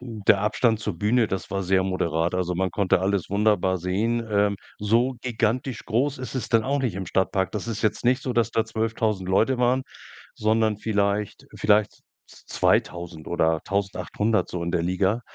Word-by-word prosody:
der 110 -5 +1
Abstand 110 +1 +1
zur 105 -4 -4
Bühne, 115 +3 +2
das 95 -2 -4
war 100 0 -1
sehr 95 +1 +2
moderat. 85 -3 -1
Also, 90 -1 -1
man 95 +1 0
konnte 95 0 +1
alles 95 -2 0
wunderbar 100 -2 +2
sehen, 110 +7 -1
ähm, 100 -1 +2 0.2
so 115 +5 +2
gigantisch 120 +1 -1
groß 135 +5 0
ist 130 +1 -6
es 130 - -3
dann 115 -1 +3
auch 140 +5 0
nicht 125 -8 -1
im 95 -1 -5
Stadtpark. 95 +1 0
Das 105 0 -5
ist 115 -2 -4
jetzt 110 +1 0
nicht 125 +2 +2
so, 130 - -2
dass 115 -1 +1
da 115 - +1
12.000 110 -4 -2
Leute 115 +7 +2
waren, 125 +2 +2 0.5
sondern 110 0 +1
vielleicht 105 -1 -1
vielleicht 105 0 +2 0.3
z - - -18
2.000 85 -2 0
oder 80 -2 +1
1.800 100 +2 -1
so 90 - -4
in 85 - -2
der 85 -1 0
Liga, 95 +5 +1
105 Hz, 180 wpm, -24 LUFS, 95-115 Hz, 0.5 s, dann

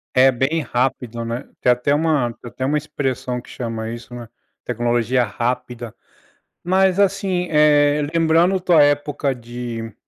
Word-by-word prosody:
É 130 +1 +6
bem 135 +6 0
rápido, 125 -2 -2
né. 115 +3 -4 0.2
Tem 125 - +4
até 125 +4 +1
uma 150 -5 +1
tem 120 - -11
até 130 +2 -4
uma 150 +3 +1
expressão 130 -4 -3
que - - -18
chama 115 -2 -5
isso, 120 +1 -8
né. 120 -2 -8 0.4
Tecnologia 120 +1 +1
rápida. 120 +1 -3 0.7
Mas 190 +1 +2
assim, 195 -2 +1
eh, 150 -1 +4
lembrando 165 +3 +3
tua 175 -4 +5
época 145 -1 +1
de 120 -2 -7
130 Hz, 145 wpm, -20 LUFS, 120-150 Hz, 0.7 s, É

